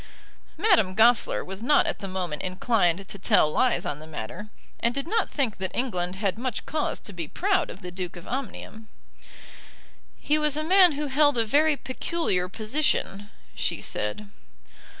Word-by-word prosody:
Madame 345 - +3
Goesler 230 +2 +3
was 190 +2 -7
not 285 +5 +4
at - - -2
the 195 - -5
moment 180 -5 -3
inclined 185 -1 0
to 200 - -9
tell 150 - +3
lies 255 +9 +1
on 145 - -3
the 155 - -11
matter, 160 - -7 0.3
and 235 +2 0
did 275 +2 -3
not 440 +2 0
think 260 -8 -1
that 190 0 -2
England 180 -8 -1
had 200 +1 -2
much 250 -2 -3
cause 305 0 -2
to 205 - -9
be 170 -3 -5
proud 375 - 0
of 190 - -10
the 180 - -6
Duke 180 -1 -5
of 175 - -11
Omnium. 225 -3 -6 1.3
"He 300 +1 +1
was 300 -1 +1
a 305 - -1
man 365 0 +6
who 295 +1 -3
held 290 0 +3
a 230 - +2
very 295 +5 +3
peculiar 255 - -1
position," 215 -2 -1 0.2
she - - -2
said. 105 - -3
220 Hz, 170 wpm, -26 LUFS, 185-290 Hz, 1.3 s, man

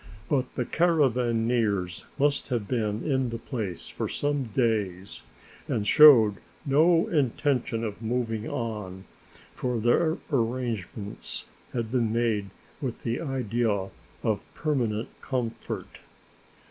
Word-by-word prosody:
But 130 -3 0
the 125 - -1
caravaneers 120 - +1
must 145 0 +1
have 120 -6 -2
been 110 -3 -1
in 130 -4 +1
the 115 - -4
place 110 - -5
for - - -4
some 145 -2 -1
days 105 -5 -1 0.5
and 105 - -1
showed 120 -10 +8 0.3
no 160 +4 +4
intention 135 -5 0
of 105 -1 -4
moving 115 -1 -2
on, 105 -5 -4 0.5
for 125 -2 -2
their 155 +9 +3 0.2
arrangements 115 -5 -2 0.3
had 115 -2 -2
been 120 -4 +1
made 110 -4 0 0.3
with 130 -4 -4
the 115 +4 -1
idea 115 -8 -1 0.3
of - - +1
permanent 120 -8 -1
comfort. 125 -4 -4
115 Hz, 110 wpm, -27 LUFS, 110-130 Hz, 0.5 s, showed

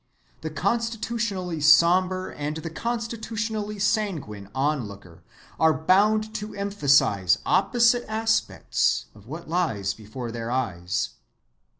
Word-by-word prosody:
The 160 - -4
constitutionally 210 -2 -2
sombre 180 +4 +4
and 150 +1 -3
the 160 0 -6
constitutionally 220 0 -3
sanguine 170 - -1
onlooker 105 - -3 0.4
are 160 -1 +4
bound 210 +6 +3
to 215 -1 -5
emphasize 140 - +3
opposite 240 0 +3
aspects 220 0 0
of 105 0 -17
what 160 +6 -8
lies 115 - 0
before 115 +3 -7
their 115 0 -5
eyes. 95 -9 -2
175 Hz, 100 wpm, -25 LUFS, -, 0.4 s, sombre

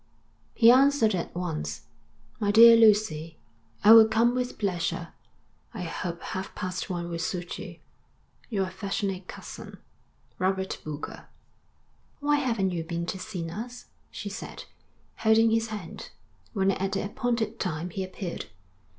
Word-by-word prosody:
_ - - -40 0.5
He 230 0 +7
answered 265 -4 +4
at 175 -2 -3
once. 175 -3 -4 0.6
My 205 -2 0
Dear 230 +2 +9
Lucy: 205 -8 +3 0.5
I 210 - +8
will 225 -1 +9
come 230 +2 +3
with 250 0 -2
pleasure. 180 -5 -2 0.7
I 185 - -4
hope 170 0 -5
half 190 0 -5
past 185 +2 -4
one 175 -2 -3
will 170 -1 -4
suit 175 +1 -4
you. - - -8 0.7
Your 200 -5 0
affectionate 190 0 -3
cousin, - - -9 0.6
Robert 190 +1 -1
Boulger. 150 -1 -7 0.9
'Why 290 0 +2
haven't 230 -9 0
you 170 -2 -2
been 170 +1 -3
to 190 - -4
see 185 -4 -5
us?' 235 +8 -7 0.2
she - - -7
said, - - -7 0.5
holding 220 0 +4
his 225 0 +1
hand, 210 -7 -7 0.4
when 195 -3 +2
at 195 0 -2
the 195 - -1
appointed 235 -1 -2
time 175 -1 -3
he 190 - -3
appeared. 185 -1 -6
195 Hz, 140 wpm, -27 LUFS, 180-225 Hz, 0.9 s, Dear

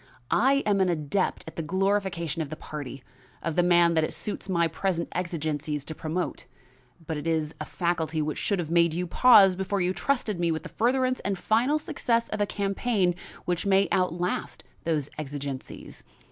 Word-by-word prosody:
I 275 +3 +4
am 200 -2 +2
an 185 - +3
adept 170 +3 -1
at 160 - -10
the - - -1
glorification 185 -2 0
of 150 - -4
the 155 - -5
party, 140 -4 -7 0.4
of 165 -1 -2
the 175 - +4
man 175 -1 +5
that 160 -1 +3
it - - -2
suits 205 -1 -5
my 170 -2 +2
present 170 -1 -2
exigencies 155 -4 -2
to 160 - -5
promote, 160 +3 -4 0.6
but 160 -1 -3
it 150 - -5
is 160 -2 0
a - - -3
faculty 165 -2 -1
which 155 -1 -2
should 200 - 0
have 165 -3 -3
made 170 -1 +4
you 180 +1 -1
pause 195 -1 +6
before 190 +2 -1
you 180 0 +1
trusted 225 -6 -1
me 170 -1 +2
with 160 - -2
the - - -7
furtherance 255 +2 +1
and 195 -1 -2
final 235 +10 +2
success 235 -6 -1
of 215 - -2
a 205 - +2
campaign 200 -1 0 0.3
which 180 +2 -1
may 195 0 +4
outlast 180 -1 -1 0.2
those 155 -4 0
exigencies. 140 -2 -6
175 Hz, 185 wpm, -27 LUFS, 160-200 Hz, 0.6 s, pause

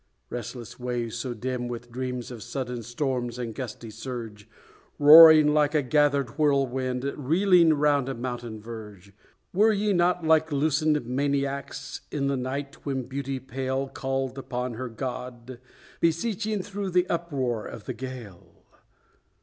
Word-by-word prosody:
Restless 120 0 -7
waves, 120 -2 -3
so 120 +1 -4
dim 125 +1 -3
with 120 0 -7
dreams 125 0 -4
of 120 -3 -8
sudden 125 +1 -4
storms 120 0 -2
and 120 -2 -4
gusty 115 -2 -7
surge, 115 -4 -7 0.5
Roaring 155 0 +9
like 150 0 +2
a 150 - +3
gathered 140 -2 +1
whirlwind 130 -3 +1
reeling 170 +3 +4
round 145 -2 +2
a 135 - -3
mountain 120 -2 -5
verge, 105 -3 -10 0.4
Were 215 +4 +5
ye 210 0 +1
not 175 -1 +2
like 160 0 +3
loosened 150 0 +1
maniacs, 140 +1 -2
in 140 -2 -2
the 140 0 +1
night 135 +2 -5
when 135 -2 -2
Beauty 135 +1 -4
pale 130 +1 -3
Called 135 0 -3
upon 125 -2 -4
her 125 +2 -5
God, 125 +1 -6 0.4
beseeching 205 +4 0
through 200 0 -4
the 180 0 +3
uproar 135 -10 -2
of 110 - -9
the - - -4
gale? 125 -8 -10
130 Hz, 140 wpm, -26 LUFS, 120-150 Hz, 0.5 s, Roaring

